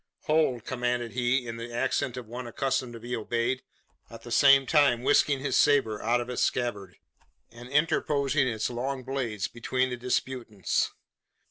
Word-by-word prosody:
"Hold!" 150 -7 +1
commanded 120 -2 -2
he, 125 +1 0
in 115 -1 -6
the 115 +1 -7
accent 125 +2 -1
of 125 - -6
one 120 +2 -7
accustomed 130 0 -2
to 115 - -8
be 120 +2 -4
obeyed, 120 +3 -1 0.5
at 115 - -12
the 120 - -9
same 135 +1 +6
time 140 -5 +3
whisking 140 0 +3
his 140 - -1
sabre 125 -8 +3
out 120 +2 +2
of 120 - -4
its 125 - -3
scabbard, 105 -7 -2 0.6
and 120 +1 -12
interposing 145 -2 +1
its 110 -1 -2
long 130 +2 -3
blade 125 -6 -3
between 130 +2 -1
the 125 - -3
disputants. 120 -4 -1
125 Hz, 160 wpm, -28 LUFS, 120-135 Hz, 0.6 s, same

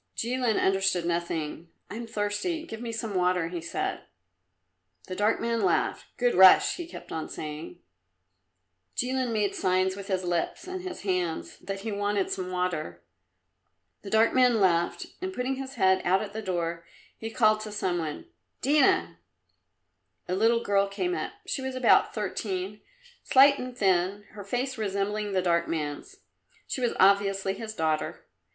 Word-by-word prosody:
Jilin 245 -1 0
understood 190 -2 +2
nothing. 170 -1 -3 0.2
"I - - -5
am 235 +1 -6
thirsty; 220 - -2
give 225 -8 -8
me 235 -1 -4
some 225 -2 -4
water," 180 -2 +1
he 175 -1 -5
said. 170 - -3 1.0
The 185 - -6
dark 210 +3 +2
man 230 -1 0
laughed. 185 -4 +1
"Good 245 -1 +2
Russ!" 190 0 +7
he 345 -2 -6
kept - - -11
on 160 - -4
saying. 155 +3 -7 1.2
Jilin 255 0 0
made 210 -2 0
signs 185 0 +1
with 200 -1 -8
his 190 -2 -1
lips 175 - -2
and 370 0 -5 0.2
hands 180 -4 -2
that 195 +1 -5
he 220 +1 -4
wanted 205 -1 0
some 185 -1 -3
water. 175 - -3 1.0
The 200 - -8
dark 220 +2 +4
man 250 -3 +4
laughed, 175 -3 +2 0.2
and 375 +1 -3
putting 265 -5 -2
his 270 0 -6
head 190 -4 +3
out 190 +3 +2
at 205 -1 -8
the 220 - -4
door, 170 -4 -2 0.3
he 225 - -6
called 215 -2 +3
to 215 -1 -6
some 185 -4 -1
one 155 - -5 0.4
"Dina!" 275 - +3 1.1
A 180 - -2
little 230 +4 +3
girl 200 0 +2
came 355 - -2
up. - - -3
She 270 - -3
was 265 0 -4
about 255 -2 +4
thirteen, 205 -2 -3 0.4
slight 280 +1 +6
and 250 -1 -6
thin, 190 0 +1
her 205 -2 -9
face 250 +4 -3
resembling 205 0 -1
the 185 -1 +1
dark 170 -1 +2
man's. 155 - -4 0.5
She 260 - -4
was 240 - +1
obviously 195 0 +3
his 220 +1 -7
daughter. 155 -3 -1
200 Hz, 160 wpm, -27 LUFS, 180-230 Hz, 1.2 s, Russ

